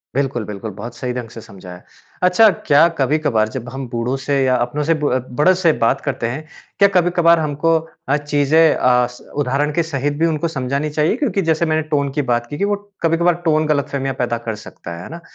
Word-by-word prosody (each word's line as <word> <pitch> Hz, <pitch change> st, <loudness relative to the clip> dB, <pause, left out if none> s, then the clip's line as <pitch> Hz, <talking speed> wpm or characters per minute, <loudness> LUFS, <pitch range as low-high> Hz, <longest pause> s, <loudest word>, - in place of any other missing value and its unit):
बिल्कुल, 135 Hz, -4 st, -1 dB
बिल्कुल, 105 Hz, +1 st, -6 dB
बहुत 110 Hz, +5 st, -8 dB
सही 125 Hz, +1 st, -4 dB
ढंग 125 Hz, -2 st, -5 dB
से 115 Hz, -, -10 dB
समझाया। 90 Hz, -4 st, -12 dB, 0.4 s
अच्छा, 185 Hz, +5 st, +6 dB
क्या 160 Hz, -2 st, +3 dB
कभी-कभार 135 Hz, -5 st, +1 dB
जब 125 Hz, 0 st, -6 dB
हम 135 Hz, 0 st, -6 dB
बूढ़ों 120 Hz, +2 st, -2 dB
से 140 Hz, 0 st, 0 dB
या 130 Hz, -1 st, +2 dB
अपनों 125 Hz, +4 st, -1 dB
से, 165 Hz, +3 st, +2 dB
ब 145 Hz, -5 st, -1 dB
बड़ों 185 Hz, +5 st, +5 dB
से 175 Hz, -3 st, +3 dB
बात 135 Hz, +4 st, +2 dB
करते 130 Hz, -5 st, -2 dB
हैं, 135 Hz, +7 st, -5 dB, 0.3 s
क्या 200 Hz, -, +7 dB
कभी-कभार 175 Hz, -1 st, +4 dB
हमको 155 Hz, +2 st, +1 dB, 0.3 s
अ, 145 Hz, -, +3 dB
चीज़ें 150 Hz, +2 st, +3 dB
अ, 125 Hz, -1 st, +3 dB
स 125 Hz, 0 st, -15 dB
उदाहरण 145 Hz, +2 st, 0 dB
के 170 Hz, -, +1 dB
सहित 145 Hz, -3 st, -2 dB
भी 165 Hz, -, +3 dB
उनको 165 Hz, 0 st, 0 dB
समझानी 140 Hz, 0 st, -2 dB
चाहिए? 150 Hz, +5 st, +1 dB
क्योंकि 250 Hz, -8 st, 0 dB
जैसे 165 Hz, -1 st, +1 dB
मैंने 155 Hz, -1 st, +1 dB
टोन 140 Hz, -1 st, +1 dB
की -, -, +3 dB
बात 120 Hz, 0 st, -1 dB
की 145 Hz, -, -5 dB
कि 200 Hz, -, 0 dB
वो 205 Hz, 0 st, +1 dB, 0.3 s
कभी-कभार 170 Hz, +1 st, +2 dB
टोन 155 Hz, -1 st, +2 dB
गलतफ़हमियाँ 140 Hz, -2 st, -1 dB
पैदा 120 Hz, -1 st, 0 dB
कर 110 Hz, -, -1 dB
सकता 85 Hz, -, -9 dB
है, 85 Hz, -, -8 dB
है -, -, -9 dB
ना? 170 Hz, +1 st, -8 dB
145 Hz, 215 wpm, -19 LUFS, 125-160 Hz, 0.4 s, क्या